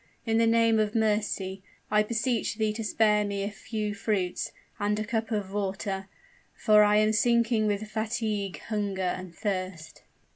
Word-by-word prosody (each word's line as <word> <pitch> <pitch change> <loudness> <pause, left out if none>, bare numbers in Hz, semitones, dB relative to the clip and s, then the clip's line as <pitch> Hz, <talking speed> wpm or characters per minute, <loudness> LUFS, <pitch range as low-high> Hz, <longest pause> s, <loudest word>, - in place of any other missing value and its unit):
In 225 -1 +2
the 230 - +4
name 230 -1 +4
of 215 0 0
mercy! 210 -3 0 0.3
I 210 0 +5
beseech 230 +2 -1
thee 215 -1 0
to 225 +1 -4
spare 210 0 +3
me 200 -1 -2
a 200 - -3
few 210 0 -4
fruits, 200 -3 -1 0.3
and 205 +1 +1
a 215 - -2
cup 225 0 -2
of 205 -4 -2
water, 195 -1 -2 0.5
for 215 -1 +5
I 210 0 +4
am 215 0 +3
sinking 230 0 +3
with 205 +1 -1
fatigue, 215 -4 -2
hunger, 205 -3 -2
and 180 -1 -3
thirst." 185 -5 -4
210 Hz, 160 wpm, -28 LUFS, 200-220 Hz, 0.5 s, I